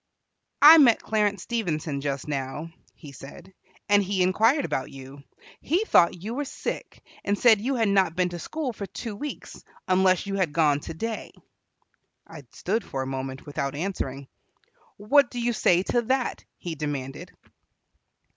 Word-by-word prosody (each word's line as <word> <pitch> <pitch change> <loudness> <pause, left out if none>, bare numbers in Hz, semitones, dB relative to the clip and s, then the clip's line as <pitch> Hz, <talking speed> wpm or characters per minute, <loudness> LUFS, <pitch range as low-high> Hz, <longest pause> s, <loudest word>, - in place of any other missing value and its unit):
"I 315 +2 +11
met 245 -6 +6
Clarence 210 -3 0
Stevenson 160 -11 -2
just 140 -1 -3
now," 145 +3 -4 0.2
he 145 - -12
said, 140 +8 -12 0.3
"and 205 0 +5
he 190 -1 0
inquired 225 +10 +3
about 130 - -3
you. 135 +1 -11 0.4
He 360 +8 0
thought 170 - +3
you 220 +3 -4
were 285 +4 -2
sick, 275 - -6 0.2
and 200 +1 0
said 220 -3 +5
you 265 +4 -1
had 225 -3 +1
not 190 -4 +2
been 180 0 +1
to 175 0 -7
school 285 - -4
for 200 -2 -6
two 225 0 -6
weeks, 290 +7 -8 0.2
unless 185 0 +3
you 200 - -4
had 180 -6 0
gone 150 -3 +3
today." 215 +10 -5 0.9
I 150 -5 -12
stood 215 +4 -2
for 135 -5 -4
a - - -6
moment 130 0 -5
without 140 -1 -3
answering. 140 -6 -4 0.7
"What 245 +6 +3
do 245 - -6
you 240 0 0
say 180 -4 +3
to 240 - +1
that?" 260 +2 -1
he 175 - -5
demanded. 145 -3 -5
185 Hz, 160 wpm, -25 LUFS, 145-225 Hz, 0.9 s, I